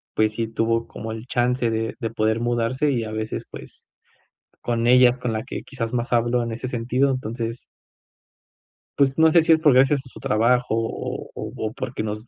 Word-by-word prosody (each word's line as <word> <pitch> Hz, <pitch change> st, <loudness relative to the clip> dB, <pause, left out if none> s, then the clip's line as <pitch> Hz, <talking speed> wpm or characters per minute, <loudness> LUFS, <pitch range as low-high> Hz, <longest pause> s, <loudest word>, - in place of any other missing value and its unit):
pues 110 Hz, 0 st, +2 dB
sí 115 Hz, +1 st, -2 dB
tuvo 115 Hz, +1 st, 0 dB
como 110 Hz, -, -7 dB
el 110 Hz, +1 st, -8 dB
chance 125 Hz, -1 st, +1 dB
de 110 Hz, 0 st, -2 dB
de 115 Hz, -4 st, -2 dB
poder 110 Hz, 0 st, 0 dB
mudarse, 120 Hz, +4 st, 0 dB
y, 120 Hz, -4 st, 0 dB
a 110 Hz, -, -6 dB
veces, 110 Hz, 0 st, -4 dB
pues, -, -, -12 dB, 0.7 s
con 115 Hz, -1 st, -1 dB
ella 125 Hz, 0 st, +7 dB
es 125 Hz, -, -6 dB
con 125 Hz, -2 st, -2 dB
la 110 Hz, 0 st, -2 dB
que 135 Hz, -, -6 dB
quizás 115 Hz, -4 st, -5 dB
más 120 Hz, +1 st, -2 dB
hablo 120 Hz, +1 st, +2 dB
en 115 Hz, -1 st, -3 dB
ese 120 Hz, +3 st, -5 dB
sentido, 125 Hz, +3 st, 0 dB
entonces 115 Hz, -2 st, -3 dB, 1.4 s
Pues 135 Hz, -1 st, +3 dB
no 160 Hz, 0 st, +5 dB
sé 170 Hz, -, +6 dB
si 165 Hz, -, +2 dB
es 160 Hz, -, +6 dB
por 150 Hz, -4 st, +5 dB
gracias 135 Hz, +2 st, +4 dB
a -, -, -13 dB
su -, -, -13 dB
trabajo, 120 Hz, +1 st, +2 dB
o 115 Hz, 0 st, -4 dB
o -, -, -5 dB, 0.2 s
o -, -, +1 dB
o -, -, -13 dB
porque 130 Hz, -2 st, -4 dB
nos 110 Hz, +2 st, -5 dB
120 Hz, 210 wpm, -23 LUFS, 115-130 Hz, 1.4 s, ella